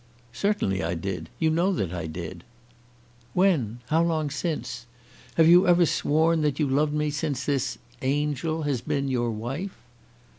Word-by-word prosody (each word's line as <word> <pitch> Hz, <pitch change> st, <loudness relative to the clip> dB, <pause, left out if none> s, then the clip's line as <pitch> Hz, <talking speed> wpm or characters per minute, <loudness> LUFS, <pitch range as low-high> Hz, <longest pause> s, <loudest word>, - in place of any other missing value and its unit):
"Certainly 200 Hz, -, 0 dB
I 85 Hz, +2 st, -1 dB
did. 90 Hz, +2 st, -4 dB
You 160 Hz, -1 st, +2 dB
know 175 Hz, +5 st, +2 dB
that 95 Hz, -, -2 dB
I 85 Hz, -2 st, -4 dB
did." 85 Hz, +2 st, -7 dB, 0.9 s
"When? 140 Hz, -, +2 dB
How 160 Hz, +2 st, +3 dB
long 160 Hz, -3 st, 0 dB
since? 120 Hz, -8 st, -3 dB, 0.5 s
Have 160 Hz, -1 st, +5 dB
you 175 Hz, +3 st, +7 dB
ever 175 Hz, -1 st, +5 dB
sworn 160 Hz, +2 st, +2 dB
that 145 Hz, -2 st, +1 dB
you 150 Hz, -, +1 dB
loved 145 Hz, +3 st, +1 dB
me 150 Hz, 0 st, 0 dB
since 145 Hz, -2 st, -2 dB
this 140 Hz, -3 st, 0 dB, 0.2 s
angel 150 Hz, +3 st, -1 dB
has 140 Hz, -5 st, -1 dB
been 140 Hz, +1 st, -1 dB
your 120 Hz, -2 st, 0 dB
wife?" 135 Hz, -, -4 dB
145 Hz, 155 wpm, -26 LUFS, 120-160 Hz, 0.9 s, you